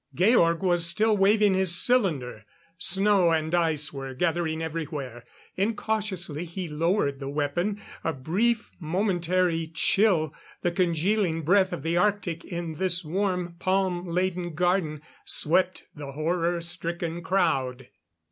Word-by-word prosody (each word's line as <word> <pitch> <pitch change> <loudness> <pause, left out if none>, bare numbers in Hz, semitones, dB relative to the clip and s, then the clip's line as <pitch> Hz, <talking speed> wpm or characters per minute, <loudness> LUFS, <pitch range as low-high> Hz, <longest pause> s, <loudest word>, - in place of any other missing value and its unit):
Georg 175 - +3
was 175 -2 +3
still 215 +5 +3
waving 205 +1 +4
his 185 -2 +4
cylinder. 155 - +1 0.4
Snow 195 -1 +3
and 160 0 0
ice 160 -4 +1
were 135 -1 -6
gathering 165 +1 -1
everywhere. 150 -7 -5 0.3
Incautiously 200 -6 -2
he 175 +1 -6
lowered 155 -2 0
the 135 -1 -5
weapon; 155 +8 -1 0.2
a 165 - 0
brief, 205 - -1
momentary 175 -1 0
chill 165 -3 +2 0.3
the 175 - +1
congealing 175 0 0
breath 185 +4 +3
of 135 - -5
the 165 +2 0
Arctic 180 -3 0
in 170 -2 -5
this 180 -2 0
warm 180 0 -2
palm 185 -1 0
laden 175 -1 -2
garden 175 -4 0 0.2
swept 185 +4 +2
the 145 -2 -8
horror 170 +3 -1
stricken 170 0 -3
crowd. 135 -9 0
175 Hz, 125 wpm, -26 LUFS, 160-190 Hz, 0.4 s, waving